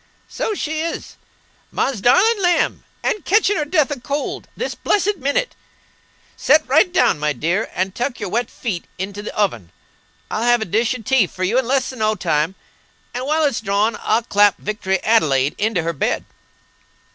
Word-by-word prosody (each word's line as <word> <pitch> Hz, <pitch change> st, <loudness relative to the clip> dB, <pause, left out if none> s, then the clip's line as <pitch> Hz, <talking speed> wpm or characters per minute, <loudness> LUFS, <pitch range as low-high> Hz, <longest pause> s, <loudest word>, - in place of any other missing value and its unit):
"So 430 Hz, -, -3 dB
she 315 Hz, -4 st, -3 dB
is! 335 Hz, +1 st, -5 dB, 0.6 s
Ma's 250 Hz, -8 st, -1 dB
darlin' 400 Hz, -, +4 dB
lamb! 350 Hz, -3 st, +1 dB, 0.2 s
and 420 Hz, -, -1 dB
ketehin' 410 Hz, +1 st, +3 dB
her 300 Hz, -, 0 dB
death 300 Hz, -2 st, +1 dB
a 285 Hz, -, -3 dB
cold 280 Hz, +4 st, -4 dB
this -, -, -3 dB
blessed 415 Hz, 0 st, 0 dB
minnit. 290 Hz, -, -1 dB, 0.8 s
Set 300 Hz, +1 st, +3 dB
right 315 Hz, +7 st, +4 dB
down, 350 Hz, -, +3 dB
my 150 Hz, 0 st, 0 dB
dear, 175 Hz, +9 st, -1 dB
and 185 Hz, +1 st, -1 dB
tuck 245 Hz, +3 st, -3 dB
your -, -, -4 dB
wet 235 Hz, +4 st, -1 dB
feet 195 Hz, -8 st, -4 dB
into 195 Hz, +2 st, -5 dB
the 210 Hz, -, -7 dB
oven. 120 Hz, -, -1 dB, 0.6 s
I'll 215 Hz, -, -1 dB
have 240 Hz, -1 st, +3 dB
a -, -, -5 dB
dish 225 Hz, +7 st, 0 dB
o' 225 Hz, -, -12 dB
tea 255 Hz, -4 st, +3 dB
for 185 Hz, -, -6 dB
you 220 Hz, +8 st, +2 dB
in 260 Hz, -, -2 dB
less 265 Hz, 0 st, 0 dB
'n 255 Hz, -, -10 dB
no 215 Hz, 0 st, +1 dB
time; 165 Hz, -1 st, 0 dB, 0.6 s
and 250 Hz, +2 st, -4 dB
while 310 Hz, +2 st, +2 dB
it's 275 Hz, -7 st, 0 dB
drawin' 205 Hz, +2 st, +1 dB
I'll 225 Hz, +2 st, +1 dB
clap 205 Hz, -3 st, +3 dB
Victory 190 Hz, -2 st, -2 dB
Adelaide 145 Hz, -11 st, +3 dB
into 205 Hz, -5 st, 0 dB
her 170 Hz, +1 st, -1 dB
bed." 140 Hz, -, -1 dB
230 Hz, 180 wpm, -20 LUFS, 195-290 Hz, 0.8 s, darlin